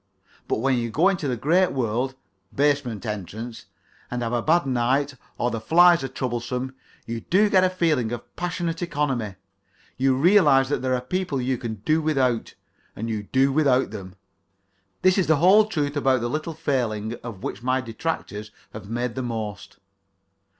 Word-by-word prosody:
But -, -, -1 dB
when 130 Hz, -1 st, +2 dB
you 115 Hz, 0 st, -2 dB
go 165 Hz, -, +3 dB
into 175 Hz, -7 st, -1 dB
the 125 Hz, -2 st, -1 dB
great 175 Hz, +9 st, +2 dB
world 125 Hz, +1 st, -1 dB, 0.4 s
(basement 140 Hz, -6 st, 0 dB
entrance) 110 Hz, +3 st, -6 dB, 0.4 s
and 125 Hz, 0 st, -3 dB
have 115 Hz, +1 st, -2 dB
a 120 Hz, -, +1 dB
bad 165 Hz, +4 st, +3 dB
night, 135 Hz, +3 st, +1 dB, 0.2 s
or 120 Hz, -, 0 dB
the 115 Hz, -, -3 dB
flies 170 Hz, +5 st, +5 dB
are -, -, -1 dB
troublesome, 125 Hz, 0 st, -3 dB, 0.3 s
you 115 Hz, 0 st, -4 dB
do 205 Hz, -, +2 dB
get 185 Hz, -1 st, +5 dB
a 185 Hz, -, +4 dB
feeling 155 Hz, -10 st, +1 dB
of 120 Hz, -1 st, -7 dB
passionate 175 Hz, -1 st, -3 dB
economy; 140 Hz, -, -1 dB, 0.6 s
you 130 Hz, 0 st, +3 dB
realize 145 Hz, -5 st, +5 dB
that 145 Hz, -, -1 dB
there 130 Hz, 0 st, +1 dB
are 125 Hz, -, -2 dB
people 160 Hz, +2 st, -2 dB
you 125 Hz, 0 st, -1 dB
can 110 Hz, -4 st, -6 dB
do 155 Hz, +1 st, +3 dB
without, 130 Hz, -7 st, 0 dB, 0.4 s
and 115 Hz, +2 st, -4 dB
you 110 Hz, -1 st, -2 dB
do 135 Hz, +1 st, +3 dB
without 135 Hz, -6 st, +3 dB
them. 95 Hz, -3 st, -8 dB, 0.9 s
This 185 Hz, +1 st, +4 dB
is 185 Hz, -, +1 dB
the 160 Hz, -, +5 dB
whole 190 Hz, +8 st, +6 dB
truth 150 Hz, -8 st, -2 dB
about 135 Hz, -4 st, +2 dB
a -, -, 0 dB
little 155 Hz, +5 st, -3 dB
failing 115 Hz, -8 st, -1 dB
of 115 Hz, -6 st, -8 dB
which -, -, -4 dB
my 130 Hz, +1 st, +1 dB
detractors 115 Hz, -4 st, -4 dB, 0.2 s
have 105 Hz, -2 st, -9 dB
made 120 Hz, +1 st, -2 dB
the 130 Hz, -, -3 dB
most. 110 Hz, -5 st, -5 dB
130 Hz, 175 wpm, -24 LUFS, 115-155 Hz, 0.9 s, whole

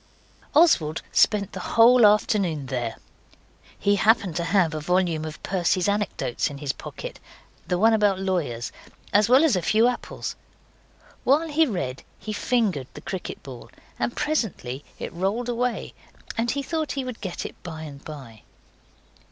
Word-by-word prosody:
Oswald 175 Hz, -, +4 dB
spent 205 Hz, -2 st, +3 dB
the 190 Hz, -, -6 dB, 0.2 s
whole 235 Hz, 0 st, +8 dB
afternoon 195 Hz, -8 st, +2 dB
there. 120 Hz, -4 st, -3 dB, 0.8 s
He 200 Hz, 0 st, +2 dB
happened 200 Hz, -5 st, +3 dB
to 170 Hz, -, -1 dB
have 180 Hz, -5 st, +2 dB
a 155 Hz, -, -2 dB
volume 175 Hz, -1 st, +1 dB
of 155 Hz, -1 st, -8 dB
Percy's 180 Hz, -1 st, +1 dB
Anecdotes 200 Hz, -, -1 dB
in 145 Hz, -, -8 dB
his 140 Hz, -2 st, -2 dB
pocket, -, -, -8 dB, 0.5 s
the 180 Hz, -, +1 dB
one 225 Hz, +4 st, +5 dB
about 205 Hz, -3 st, +3 dB
lawyers, 170 Hz, -12 st, -2 dB, 0.4 s
as 210 Hz, +1 st, +4 dB
well 260 Hz, +4 st, +7 dB
as 305 Hz, -10 st, +4 dB
a 180 Hz, -, 0 dB
few 215 Hz, +5 st, +4 dB
apples. 250 Hz, -, -4 dB, 0.9 s
While 305 Hz, +5 st, +3 dB
he 315 Hz, +1 st, +3 dB
read 135 Hz, -, -3 dB, 0.2 s
he 215 Hz, -, -6 dB
fingered 210 Hz, -, 0 dB
the -, -, -8 dB
cricket 190 Hz, -2 st, -6 dB
ball, 125 Hz, -4 st, -10 dB, 0.3 s
and 240 Hz, -, -1 dB
presently 210 Hz, -, -2 dB
it -, -, -6 dB
rolled 200 Hz, +8 st, -1 dB
away, 245 Hz, 0 st, -2 dB, 0.4 s
and 235 Hz, +1 st, 0 dB
he 280 Hz, +3 st, -1 dB
thought 315 Hz, +1 st, -2 dB
he 275 Hz, -, -2 dB
would 250 Hz, -3 st, -7 dB
get 185 Hz, -3 st, -4 dB
it -, -, -6 dB
by 160 Hz, -3 st, -7 dB
and 140 Hz, -2 st, -9 dB
by. 130 Hz, -8 st, -10 dB
195 Hz, 160 wpm, -25 LUFS, 155-235 Hz, 0.9 s, whole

